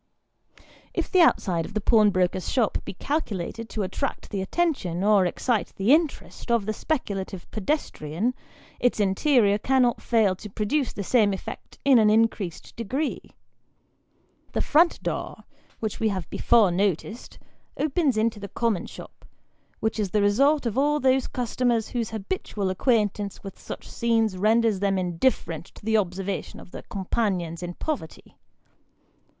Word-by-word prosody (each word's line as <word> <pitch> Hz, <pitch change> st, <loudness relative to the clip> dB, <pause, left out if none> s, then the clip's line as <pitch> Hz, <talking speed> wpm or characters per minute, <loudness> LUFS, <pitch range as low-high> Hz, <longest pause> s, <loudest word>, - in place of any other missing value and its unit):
If -, -, -2 dB
the 370 Hz, -, +5 dB
outside 180 Hz, -, +3 dB
of 205 Hz, -, -9 dB
the -, -, +2 dB
pawnbroker's 195 Hz, -4 st, +2 dB
shop 235 Hz, -5 st, +1 dB
be -, -, -7 dB
calculated 230 Hz, -, -3 dB
to 215 Hz, -, -2 dB
attract 220 Hz, +9 st, -4 dB
the 200 Hz, -3 st, -2 dB
attention, 190 Hz, -, -1 dB
or 205 Hz, -3 st, +4 dB
excite 225 Hz, +5 st, -1 dB
the 205 Hz, +8 st, +3 dB
interest, 310 Hz, -5 st, -1 dB
of 235 Hz, -4 st, +2 dB
the 215 Hz, -, -1 dB
speculative 200 Hz, -, -3 dB
pedestrian, 215 Hz, -, -2 dB, 0.5 s
its 245 Hz, -2 st, +1 dB
interior 205 Hz, +1 st, +3 dB
cannot 255 Hz, 0 st, +2 dB
fail 220 Hz, -5 st, +2 dB
to 210 Hz, -, -9 dB
produce 220 Hz, +7 st, -1 dB
the 200 Hz, -, -5 dB
same 210 Hz, -1 st, +3 dB
effect 190 Hz, -, -8 dB
in 270 Hz, -4 st, +7 dB
an 215 Hz, -1 st, +5 dB
increased 215 Hz, -5 st, 0 dB
degree. 260 Hz, +7 st, -2 dB, 1.3 s
The -, -, +1 dB
front 335 Hz, +3 st, +3 dB
door, -, -, -4 dB, 0.4 s
which 220 Hz, -2 st, -3 dB
we 220 Hz, -, +2 dB
have 185 Hz, -5 st, -3 dB
before 220 Hz, -6 st, +4 dB
noticed, 200 Hz, -, -2 dB, 0.4 s
opens 295 Hz, -4 st, +1 dB
into 220 Hz, 0 st, +1 dB
the 200 Hz, -1 st, -7 dB
common 230 Hz, -3 st, -1 dB
shop, -, -, -12 dB, 0.6 s
which 220 Hz, 0 st, -1 dB
is 205 Hz, -3 st, 0 dB
the 210 Hz, +3 st, +1 dB
resort 275 Hz, +8 st, +3 dB
of 235 Hz, +2 st, 0 dB
all 295 Hz, +2 st, +2 dB
those 260 Hz, -1 st, +2 dB
customers 240 Hz, -2 st, 0 dB
whose 235 Hz, -3 st, -2 dB
habitual 210 Hz, -, -3 dB
acquaintance 205 Hz, -1 st, 0 dB
with 195 Hz, -2 st, -9 dB
such -, -, -8 dB
scenes 225 Hz, -3 st, +1 dB
renders 215 Hz, +1 st, +2 dB
them 195 Hz, -1 st, +1 dB
indifferent 175 Hz, -, 0 dB
to -, -, -14 dB
the 220 Hz, -, 0 dB
observa 195 Hz, -1 st, 0 dB
tion -, -, -12 dB
of -, -, -14 dB
their -, -, -7 dB
companions 185 Hz, -4 st, -2 dB
in 175 Hz, 0 st, -5 dB
poverty. 290 Hz, -, -5 dB
215 Hz, 150 wpm, -25 LUFS, 195-245 Hz, 1.3 s, in